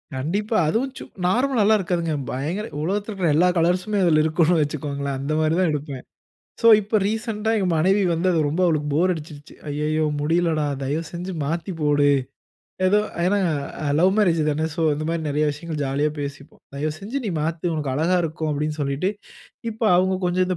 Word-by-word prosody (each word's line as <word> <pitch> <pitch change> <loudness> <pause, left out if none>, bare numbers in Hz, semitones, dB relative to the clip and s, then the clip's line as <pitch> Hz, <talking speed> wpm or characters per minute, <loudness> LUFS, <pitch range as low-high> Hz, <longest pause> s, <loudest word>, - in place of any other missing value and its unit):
கண்டிப்பா. 200 - -1
அதுவும் 250 +10 0
சு - - -7 0.2
நார்மலல்லாம் 225 0 +3
இருக்காதுங்க. 170 -3 -1 0.2
பயங்கர 165 - -3 0.2
உலகத்தில 200 +5 -2
இருக்குற 180 -6 +1
எல்லா 175 +4 +4
கலர்ஸ்ம்மே 180 +5 +1
அதில 155 -3 +4
இருக்கும்னு 160 +1 +2
வைச்சுகோங்களேன். 140 -2 -2
அந்த 140 +3 -3
மாரி 155 0 +2
தான் 180 - +3
எடுப்பேன். 145 -3 -5 0.6
சோ 230 - +6
இப்ப 210 +1 0
ரீசென்ட்டா 220 0 -2
எங்க 195 - +1
மனைவி 190 +5 +3
வந்து 170 +3 -1
அது 165 - +1
ரொம்ப 160 +5 -1
அவளுக்கு 155 -3 0
போர் 175 +5 +3
அடிச்சுருச்சு. 150 -3 -9
அய்யய்யோ 150 +2 0 0.2
முடியலடா. 160 0 +1 0.2
தயவுசெஞ்சு 165 +6 -4
மாத்திபோடு. 150 -2 0 0.8
ஏதோ 205 +3 +4 0.3
ஏன்னா 200 +3 +2 0.6
லவ் 185 +3 +5
மேரேஜ் 175 -6 +3
தான 155 +2 0
சோ - - -2
இந்த 155 +1 -4
மாரி 165 0 -1
நிறைய 150 +1 +1
விஷயங்கள் 150 +1 -6
ஜாலியா 140 +3 0
பேசிப்போம். 140 0 -8
"தயவுசெஞ்சு 155 - -3
நீ - - -1
மாத்து! 160 +2 -3
உனக்கு 145 -4 -2
அழகா 165 +6 +2
இருக்கும்." 160 -1 -3
அப்படின்னு 150 +1 -2
சொல்லிட்டு, 140 +6 0 0.6
இப்ப 220 +2 -10
அவங்க 185 +1 +2
கொஞ்சம் 180 +1 +1
இந்த 185 -1 -1
165 Hz, 165 wpm, -23 LUFS, 150-185 Hz, 0.8 s, சோ